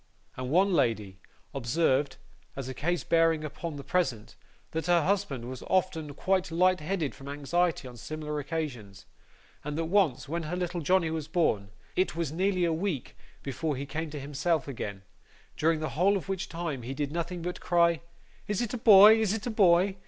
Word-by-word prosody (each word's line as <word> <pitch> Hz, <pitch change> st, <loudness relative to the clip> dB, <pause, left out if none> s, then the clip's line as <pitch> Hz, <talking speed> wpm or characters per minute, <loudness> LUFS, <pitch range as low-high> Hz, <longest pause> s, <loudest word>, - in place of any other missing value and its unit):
And 130 Hz, 0 st, -5 dB
one 190 Hz, +6 st, +3 dB
lady 110 Hz, -, 0 dB, 0.3 s
observed, 135 Hz, +2 st, +1 dB, 0.4 s
as 135 Hz, -2 st, -5 dB
a 130 Hz, -, -4 dB
case 175 Hz, +6 st, -1 dB
bearing 165 Hz, -1 st, +3 dB
upon 155 Hz, +1 st, -5 dB
the 140 Hz, -, -7 dB
present, 130 Hz, -13 st, -1 dB, 0.4 s
that 160 Hz, 0 st, -3 dB
her 175 Hz, -2 st, +4 dB
husband 175 Hz, -10 st, -1 dB
was 130 Hz, 0 st, -7 dB
often 165 Hz, -6 st, 0 dB
quite 185 Hz, +1 st, 0 dB
light 180 Hz, +2 st, +3 dB
headed 155 Hz, -2 st, -2 dB
from 135 Hz, -, -12 dB
anxiety 145 Hz, +2 st, 0 dB
on 125 Hz, -1 st, -11 dB
similar 150 Hz, +4 st, -5 dB
occasions, 135 Hz, -, -5 dB, 0.6 s
and 150 Hz, +1 st, -4 dB
that 165 Hz, -, -1 dB
once, 165 Hz, -7 st, +2 dB
when 170 Hz, +4 st, -2 dB
her 160 Hz, +2 st, -4 dB
little 180 Hz, -1 st, -2 dB
Johnny 170 Hz, 0 st, +2 dB
was 160 Hz, -2 st, -3 dB
born, 135 Hz, -, +1 dB, 0.3 s
it 185 Hz, -3 st, +1 dB
was 165 Hz, -4 st, -2 dB
nearly 185 Hz, +2 st, +1 dB
a 165 Hz, -, +1 dB
week 165 Hz, -5 st, -3 dB, 0.3 s
before 145 Hz, +2 st, -2 dB
he 135 Hz, +2 st, -4 dB
came 160 Hz, +3 st, -4 dB
to 150 Hz, 0 st, -6 dB
himself 145 Hz, +3 st, -1 dB
again, 100 Hz, -7 st, -5 dB, 0.5 s
during 160 Hz, 0 st, +1 dB
the 155 Hz, -, -2 dB
whole 195 Hz, +5 st, +2 dB
of 190 Hz, -, -7 dB
which 190 Hz, -1 st, -3 dB
time 165 Hz, -6 st, -4 dB
he 125 Hz, +3 st, -6 dB
did 145 Hz, 0 st, -2 dB
nothing 170 Hz, +1 st, -3 dB
but 180 Hz, +1 st, -4 dB
cry 170 Hz, -2 st, +3 dB, 0.5 s
'Is 205 Hz, -2 st, -1 dB
it 240 Hz, -1 st, -2 dB
a 250 Hz, -, -3 dB
boy, 215 Hz, 0 st, +9 dB
is 215 Hz, -2 st, +1 dB
it 220 Hz, -2 st, -4 dB
a 240 Hz, -, -2 dB
boy? 190 Hz, -2 st, +4 dB
165 Hz, 190 wpm, -29 LUFS, 140-180 Hz, 0.6 s, boy